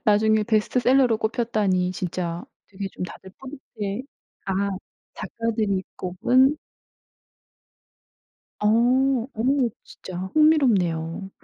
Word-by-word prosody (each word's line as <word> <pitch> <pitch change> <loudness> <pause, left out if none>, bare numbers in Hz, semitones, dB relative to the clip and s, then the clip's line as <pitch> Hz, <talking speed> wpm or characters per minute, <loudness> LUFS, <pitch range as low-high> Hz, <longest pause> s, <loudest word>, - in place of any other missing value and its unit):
나중에 215 +1 +3
베스트셀러로 240 +2 +2
꼽혔다니 215 -5 0
진짜 180 -3 -4 0.2
되게 195 0 -6
좀 - - -7
다들 190 +1 -10
뿌듯해 245 -6 -6 0.4
아 195 +1 0 0.4
작가들이 215 -4 -2
꼽은 255 +11 +2 2.0
어 210 - +1 0.7
어 220 - -3 0.4
진짜 185 - -10 0.2
흥미롭네요. 195 - +2
210 Hz, 205 characters per minute, -24 LUFS, 185-240 Hz, 2.0 s, 나중에